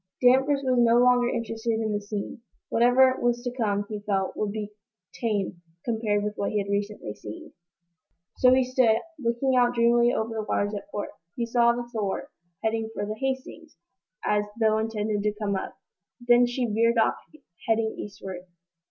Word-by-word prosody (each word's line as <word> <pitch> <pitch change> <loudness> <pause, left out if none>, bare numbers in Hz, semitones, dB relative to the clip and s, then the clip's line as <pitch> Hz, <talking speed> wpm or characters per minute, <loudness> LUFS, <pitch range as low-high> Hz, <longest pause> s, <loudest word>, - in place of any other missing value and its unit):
Danvers 265 +3 +4
was 255 -2 +2
no 235 0 +5
longer 245 0 +4
interested 225 -1 -2
in 220 -1 -1
the 205 - -1
scene. 205 +2 -5 0.3
Whatever 255 +2 +4
was 240 0 +1
to 245 - -2
come, 205 -4 0
he 210 -1 -5
felt, 195 -2 -1
would 210 -1 -2
be 210 -1 -5 0.4
tame 205 -6 -2 0.2
compared 220 -3 0
with 210 0 -2
what 200 - -1
he 215 - -1
had 200 -1 -2
recently 205 - -3
seen. 105 0 -10 0.8
So 250 - +5
he 260 0 +5
stood, 250 -3 +3 0.2
looking 255 +1 0
out 245 -1 +3
dreamily 235 +1 +4
over 225 -1 -2
the 220 - -2
waters 205 -1 -1
at 210 +9 -6
port. 205 -8 -4 0.3
He 235 - -1
saw 235 0 +3
the 240 0 -5
"Thor" 205 -4 -3 0.3
head 220 - +1 0.2
for - - -2
the 210 - -3
"Hastings," 270 +6 -5 0.5
as 210 0 +2
though 220 -1 +3
intending 215 -1 -1
to 210 0 0
come 200 -2 -1
up. 190 - -5 0.4
Then 240 0 +4
she 245 +1 -1
veered 230 +1 +2
off, 225 - +3 0.5
heading 225 -1 +1
eastward. 190 -3 -7
225 Hz, 175 wpm, -26 LUFS, 210-245 Hz, 0.8 s, no